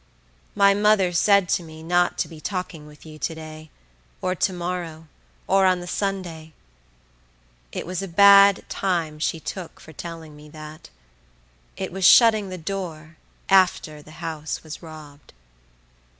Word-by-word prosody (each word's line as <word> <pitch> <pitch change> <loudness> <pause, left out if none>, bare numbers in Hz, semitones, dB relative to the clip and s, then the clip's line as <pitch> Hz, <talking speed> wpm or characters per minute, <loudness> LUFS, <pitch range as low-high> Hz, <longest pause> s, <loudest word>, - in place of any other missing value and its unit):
My 200 -1 +5
mother 205 -2 +3
said 200 +1 +4
to 175 - 0
me 160 -1 -12
not 175 +1 +1
to - - -1
be 160 -2 -12
talking 180 -5 -5
with 150 +1 -16
you 155 -1 -12
to 160 - -3
day, 155 0 -10 0.5
or 185 - -1
to 185 +2 0
morrow, 170 -3 -5 0.4
or 195 0 +3
on 185 -1 +2
the 175 - -8
Sunday; 175 -5 -4 1.2
it - - -5
was 185 +1 -4
a 195 - -5
bad 200 +2 +6
time 170 -5 -2
she 160 +1 -1
took 180 +2 -7
for 160 - -14
telling 165 -1 -9
me 150 0 -14
that; 155 0 -11 0.9
it - - -4
was 190 +1 -5
shutting 215 +1 +6
the 185 - -6
door 165 -3 -6 0.3
after 180 -5 +2
the 150 - -17 0.2
house 160 -1 -5
was 155 -1 -9
robbed. 155 -3 -13
170 Hz, 150 wpm, -23 LUFS, 155-190 Hz, 1.2 s, bad